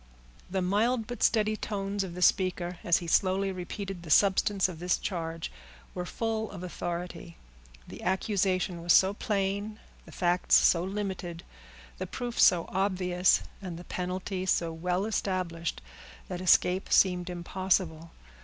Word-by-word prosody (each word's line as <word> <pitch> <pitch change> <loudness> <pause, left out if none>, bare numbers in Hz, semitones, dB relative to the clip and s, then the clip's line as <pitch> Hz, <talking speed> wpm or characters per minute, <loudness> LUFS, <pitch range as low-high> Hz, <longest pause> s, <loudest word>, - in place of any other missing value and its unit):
The 190 0 -1
mild 220 +5 +1
but 245 0 -7
steady 215 -1 +3
tones 200 -1 -3
of 175 -3 -7
the 180 - -1
speaker, 180 -2 +1
as 170 - +4
he 175 - -6
slowly 190 +3 +2
repeated 190 +1 -6
the 170 - -10
substance 195 +3 +4
of 175 -4 -8
this 175 0 +1
charge, 165 -3 -4 0.4
were 180 0 -4
full 220 0 -2
of 185 -2 -8
authority. 175 -1 -5 0.5
The - - -10
accusation 185 -2 0
was 170 0 +3
so 190 +1 +5
plain, 205 +1 -2 0.3
the - - -13
facts 175 0 +2
so 170 -1 +5
limited, 190 -3 -4 0.6
the - - -3
proof 240 -1 -5
so 170 -2 +5
obvious, 185 -2 +2 0.2
and 180 -4 -6
the 175 - -9
penalty 185 +1 -4
so 170 -2 +1
well 180 +4 -1
established, 180 - -2 0.5
that 180 -1 -4
escape 185 +1 +3
seemed 180 -1 +3
impossible. 175 -2 -1
185 Hz, 145 wpm, -29 LUFS, 175-195 Hz, 0.6 s, so